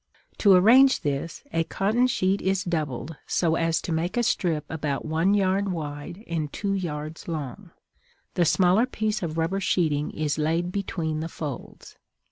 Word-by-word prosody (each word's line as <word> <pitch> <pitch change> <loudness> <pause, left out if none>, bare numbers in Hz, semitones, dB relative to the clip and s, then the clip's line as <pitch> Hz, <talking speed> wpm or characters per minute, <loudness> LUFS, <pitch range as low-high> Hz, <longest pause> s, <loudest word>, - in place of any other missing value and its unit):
To 200 -2 +6
arrange 245 +9 +6
this, 145 +3 -3
a 165 - +2
cotton 220 +9 +1
sheet 195 -5 +1
is 190 0 0
doubled 155 -3 -3
so 165 -2 +1
as 165 -1 +1
to - - -4
make 165 +6 -1
a 240 - +3
strip 165 -8 0
about 150 -3 -3
one 165 +6 +2
yard 195 0 +1
wide 155 +3 -6
and 155 -3 -3
two 200 -1 -2
yards 155 -4 -4
long; 150 -7 -5 0.6
the 175 - +2
smaller 185 +7 +4
piece 215 -3 -2
of 165 -2 -3
rubber 165 +4 0
sheeting 155 -6 +1
is 155 -1 -2
laid 165 +3 0
between 170 -5 -2
the 160 +1 -4
folds. 145 -6 -8
170 Hz, 160 wpm, -25 LUFS, 155-195 Hz, 0.6 s, To